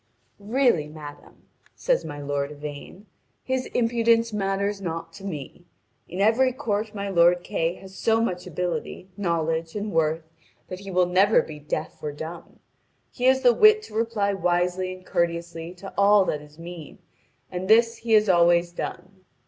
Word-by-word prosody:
"Really, 215 - +2
madame," 150 -1 -12 0.3
says - - +1
my 145 - -7
lord 145 0 -2
Yvain, 150 +7 -9 0.4
"his 260 0 -2
impudence 230 -1 +2
matters 200 0 -1
not 165 -2 -5
to 195 - -12
me. 175 -2 -7 0.4
In 180 - -6
every 230 +6 +4
court 220 -5 -2
my 200 0 -3
lord 175 -1 +4
Kay 165 +2 -1
has 190 0 -13
so 225 +3 +1
much 180 -6 -2
ability, 180 +2 -4
knowledge, 165 -3 -1
and 210 0 -3
worth 160 -1 +1 0.5
that 185 - -6
he 195 0 -9
will 180 -1 +3
never 190 +4 +4
be 150 -1 -9
deaf 155 +1 -5
or 150 - -3
dumb. 160 +4 -9 0.5
He 250 - -3
has 260 0 +5
the 245 - +6
wit 430 - +6
to 215 - -12
reply 220 -3 0
wisely 180 0 0
and 185 0 -11
courteously 170 -1 -2
to 195 +2 -10
all 200 0 +5
that 150 - -2
is 150 0 -16
mean, 170 -2 -9 0.5
and 180 +1 -4
this 230 +2 +4
he 230 -1 -1
has 215 0 +5
always 175 -1 +4
done. 185 +2 -7
185 Hz, 165 wpm, -25 LUFS, 165-215 Hz, 0.5 s, the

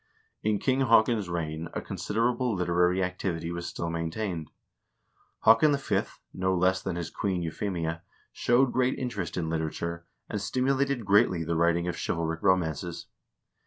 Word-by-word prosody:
In 105 -1 +1
King 130 +4 +1
Haakon's 110 -3 +4
reign 80 -1 -3
a - - 0
considerable 120 +2 -1
literary 90 +1 +2
activity 90 -2 -3
was 85 0 -4
still 85 0 -4
maintained. 85 0 -3 1.0
Haakon 140 +6 +6
V., 140 - 0 0.3
no 95 0 0
less 95 +1 +2
than 95 -3 -3
his 85 -1 -4
queen, 95 -4 -1
Kuphemia, 85 -1 -3 0.3
showed 125 +1 +3
great 130 0 +1
interest 105 -11 -3
in 85 -2 -1
literature, 85 +1 -3 0.2
and 105 - -3
stimulated 130 +2 0
greatly 95 -4 +4
the 85 +1 -1
writing 85 +1 +2
of 90 - -2
chivalric 80 -1 -2
romances. 85 -2 0
90 Hz, 140 wpm, -28 LUFS, 85-110 Hz, 1.0 s, Haakon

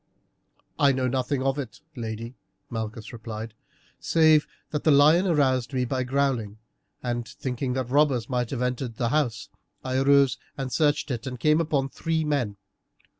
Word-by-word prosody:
"I 140 -2 +5
know 130 -1 0
nothing 130 +1 -1
of 135 +1 0
it, 130 -5 -6 0.2
lady," 115 0 -5 0.4
Malchus 110 0 -5
replied, 110 -1 -7 0.5
"save 155 -2 +4 0.2
that 150 - -2
the - - +3
lion 155 +6 +6
aroused 135 -6 +2
me 125 -1 +1
by 130 +1 -1
growling, 125 -5 0 0.5
and 120 -1 -2
thinking 125 +1 -3
that 130 -1 -3
robbers 140 -5 +3
might 125 -2 -1
have 125 -2 -2
entered 125 -1 -2
the 120 0 0
house, 125 -7 0 0.3
I 130 0 -1
arose 140 -1 +4 0.2
and 135 -2 -4
searched 150 -2 +1
it 120 +2 -4
and 125 -2 -5
came 155 +4 +3
upon 145 -4 0
three 160 +2 -1
men. 135 -9 -1
130 Hz, 160 wpm, -26 LUFS, 120-145 Hz, 0.5 s, lion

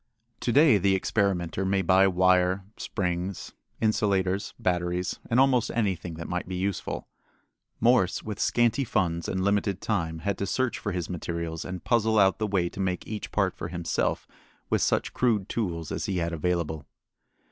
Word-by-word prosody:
To 120 - -1
day 140 -5 +6
the 95 +1 +3
experimenter 95 -2 0
may 95 0 +1
buy 95 +2 +5
wire, 90 +1 +3
springs, 90 -1 -3 0.3
insulators, 100 -3 +1
batteries, 90 0 -1
and 120 +1 +3
almost 130 -3 +4
anything 95 -7 -1
that 85 +1 -6
might 90 0 -3
be 95 - -4
useful. 95 +1 -3 0.7
Morse, 115 -5 +3
with 105 -2 -5
scanty 120 +3 +2
funds 85 -8 -1
and 95 0 -1
limited 100 -1 +1
time, 80 -7 -1
had 100 +3 -2
to 100 - -1
search 130 +5 0
for 105 - -3
his 90 -3 -3
materials 85 -2 -4
and 90 -1 -6
puzzle 110 -2 +2
out 95 -1 +4
the 110 - 0
way 95 -4 +1
to 90 - -9
make 95 -2 -1
each 105 -1 -6
part - - +1
for 80 - -5
himself 85 -1 -2 0.4
with - - +2
such - - +1
crude 110 -6 +1
tools 85 -9 -3
as - - -2
he 95 - -1
had 85 -1 -1
available. 85 -2 -2
95 Hz, 170 wpm, -27 LUFS, 90-105 Hz, 0.7 s, day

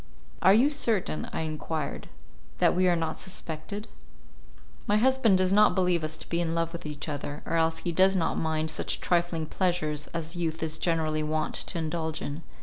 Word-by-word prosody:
"Are 195 - +7
you 265 +7 +4
certain," 225 - -1
I - - -2
enquired, 155 -1 -4 0.5
"that - - +3
we 185 +1 +3
are 175 - +4
not 160 -1 -2
suspected?" 190 +3 -5 1.0
"My 210 - +4
husband 245 -4 +4
does 185 0 +2
not 210 +1 +5
believe 180 -3 +2
us 155 +1 -3
to - - -9
be 170 0 0
in 165 -1 -1
love 165 0 -1
with 170 -2 -6
each 150 0 -6
other, 145 0 -5
or - - -4
else 160 0 +2
he 175 - +1
does 190 +3 +4
not 170 -3 +1
mind 160 0 -1
such - - -1
trifling 170 -2 0
pleasures 155 -4 -1
as 165 +1 -4
youth 165 -2 -2
is 160 0 -2
generally 160 -2 0
wont 155 0 -1
to 185 - -2
indulge 160 -1 -2
in. 145 +3 -5
165 Hz, 190 wpm, -28 LUFS, 155-185 Hz, 1.0 s, Are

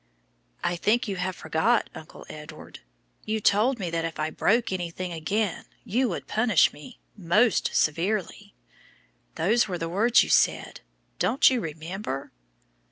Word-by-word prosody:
"I 175 - 0
think 225 +7 +1
you 195 -2 -3
have 185 0 -2
forgot, 160 +11 +1
Uncle 155 - -12
Edward. 155 +1 -11 0.4
You 220 0 -2
told 215 +6 +2
me 180 -6 -4
that 165 -1 -1
if 165 -1 -5
I 155 +1 -1
broke 230 +6 +1
anything 180 0 -4
again 190 +4 -2 0.2
you 245 +4 0
would - - -5
punish 220 -7 +3
me 150 - -13 0.2
'most 210 +4 +2
severely.' 195 +5 -1 0.8
Those 215 +7 +2
were 180 -3 -3
the 165 - -4
words 220 +7 +4
you - - -6
said; - - +2 0.4
don't 270 - +3
you 250 -3 0
remember?" 160 -3 -6
185 Hz, 145 wpm, -26 LUFS, 165-220 Hz, 0.8 s, words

